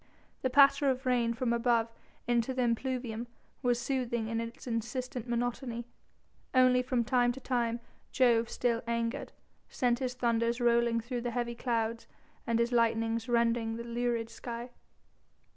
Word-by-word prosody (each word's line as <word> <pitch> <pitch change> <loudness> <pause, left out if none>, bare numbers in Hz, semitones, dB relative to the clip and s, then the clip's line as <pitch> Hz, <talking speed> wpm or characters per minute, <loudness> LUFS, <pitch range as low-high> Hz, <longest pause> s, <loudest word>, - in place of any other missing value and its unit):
The 260 - +1
patter 275 +1 +6
of 260 0 -1
the 255 - 0
rain 235 -2 +2
from 240 -1 0
above 235 -1 +2 0.4
into 240 +1 +1
the 255 - +1
impluvium 240 -1 -2 0.3
was 245 -2 +2
soothing 235 -3 -1
in 230 0 -1
its 230 0 -7
insistent 245 +1 -3
monotony, 240 0 -2 0.7
only 255 -1 +5
from 250 -1 0
time 245 0 +3
to 265 - -9
time 240 -3 -1 0.3
Jove, 235 -3 +3
still 235 -2 0
angered, 235 +3 -2 0.4
sent 245 -1 +1
his 255 -2 -2
thunders 235 -1 +1
rolling 235 -1 +3
through 240 +1 -4
the 240 - -2
heavy 240 0 -2
clouds 230 -1 -2 0.4
and 230 -1 +2
his 235 +1 +1
lightnings 230 0 +1
rending 230 -1 +2
the 235 - -5
lurid 235 -1 -2
sky. 240 0 -6
235 Hz, 150 wpm, -31 LUFS, 230-250 Hz, 0.7 s, patter